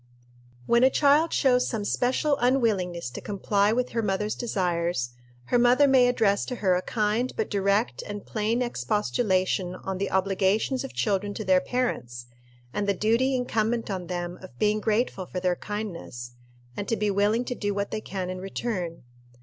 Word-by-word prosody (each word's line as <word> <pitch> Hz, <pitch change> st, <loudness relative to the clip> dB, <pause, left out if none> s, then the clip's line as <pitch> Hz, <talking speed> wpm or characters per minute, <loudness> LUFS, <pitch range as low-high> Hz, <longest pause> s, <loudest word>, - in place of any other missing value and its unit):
When 235 Hz, -, +4 dB
a 260 Hz, -, +7 dB
child 295 Hz, +4 st, +4 dB
shows 250 Hz, -3 st, +3 dB
some 215 Hz, -4 st, -3 dB
special 260 Hz, +6 st, +1 dB
unwillingness 200 Hz, -, +1 dB
to -, -, -7 dB
comply 205 Hz, 0 st, +1 dB
with 250 Hz, +2 st, 0 dB
her 230 Hz, -, -1 dB
mother's 210 Hz, 0 st, -1 dB
desires, 175 Hz, -, -1 dB, 0.4 s
her 245 Hz, -, +3 dB
mother 245 Hz, +4 st, +5 dB
may 260 Hz, -2 st, +5 dB
address 215 Hz, -5 st, +2 dB
to 250 Hz, -, -4 dB
her 195 Hz, -6 st, +2 dB
a 180 Hz, -, +1 dB
kind 220 Hz, +4 st, 0 dB
but 220 Hz, -, -2 dB
direct 200 Hz, +3 st, +1 dB
and 205 Hz, -1 st, -6 dB
plain 225 Hz, +3 st, 0 dB
expostulation 200 Hz, -5 st, 0 dB
on 190 Hz, 0 st, -5 dB
the 200 Hz, -, -1 dB
obligations 195 Hz, +7 st, +1 dB
of 270 Hz, -, -7 dB
children 205 Hz, -1 st, -1 dB
to 215 Hz, -, -5 dB
their 185 Hz, -1 st, +4 dB
parents, 125 Hz, -, -2 dB, 0.5 s
and 205 Hz, -1 st, -1 dB
the 200 Hz, -, +2 dB
duty 230 Hz, +7 st, +2 dB
incumbent 230 Hz, -2 st, -1 dB
on 185 Hz, -2 st, -4 dB
them 175 Hz, 0 st, -4 dB
of 185 Hz, -, -12 dB
being 215 Hz, 0 st, +2 dB
grateful 210 Hz, -3 st, 0 dB
for 180 Hz, -, -4 dB
their 180 Hz, -1 st, +1 dB
kindness, 175 Hz, -, -6 dB, 0.4 s
and 205 Hz, -, -4 dB
to 225 Hz, -, +1 dB
be 210 Hz, -1 st, 0 dB
willing 210 Hz, +5 st, +2 dB
to 250 Hz, -, -2 dB
do 205 Hz, -4 st, -2 dB
what 200 Hz, 0 st, -2 dB
they 215 Hz, -, -3 dB
can 185 Hz, -3 st, -4 dB
in 185 Hz, -, -5 dB
return. 185 Hz, -, -4 dB
210 Hz, 175 wpm, -26 LUFS, 185-240 Hz, 0.5 s, a